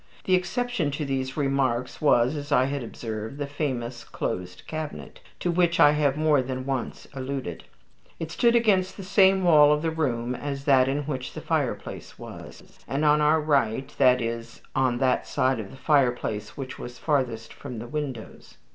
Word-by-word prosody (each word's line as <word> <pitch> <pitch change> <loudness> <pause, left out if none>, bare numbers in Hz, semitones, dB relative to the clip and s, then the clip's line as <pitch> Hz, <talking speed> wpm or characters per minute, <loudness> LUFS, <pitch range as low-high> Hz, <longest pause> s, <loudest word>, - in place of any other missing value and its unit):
The 185 - +1
exception 185 0 0
to 150 - -2
these 135 0 -3
remarks 135 -4 0
was, 130 -2 +4
as 145 0 -6
I 130 -2 +4
had 140 +1 -2
observed, 110 +1 -6
the 145 - -2
famous 130 -5 -3
closed 90 -6 -5
cabinet, 155 -1 -6 0.2
to 175 - +1
which 170 -1 +2
I 145 - +8
have 150 -2 +1
more 155 -3 +3
than 130 0 -4
once 135 -3 -4
alluded. 130 - -5 0.5
It 165 -1 -5
stood 235 0 +3
against 200 -5 +2
the 195 - -7
same 190 0 +4
wall 150 -4 +7
of 150 +1 +1
the 165 - 0
room 125 -6 -1
as 140 +1 -5
that 130 -3 +5
in 140 +2 -1
which 135 -3 -4
the - - -6
fireplace - - -3
was, - - -11
and 140 +3 -1
on 150 0 +5
our 150 +2 +4
right 135 -5 0
that 125 -2 +5
is, 115 0 -5
on 130 -2 +2
that 130 0 +1
side 130 -1 +1
of 100 -3 -6
the - - -12
fireplace 125 -7 0
which 130 -2 -6
was 120 0 -8
farthest 120 -5 -1
from 130 -4 -8
the 115 - -6
windows. 140 -5 -6
140 Hz, 180 wpm, -26 LUFS, 125-155 Hz, 0.5 s, I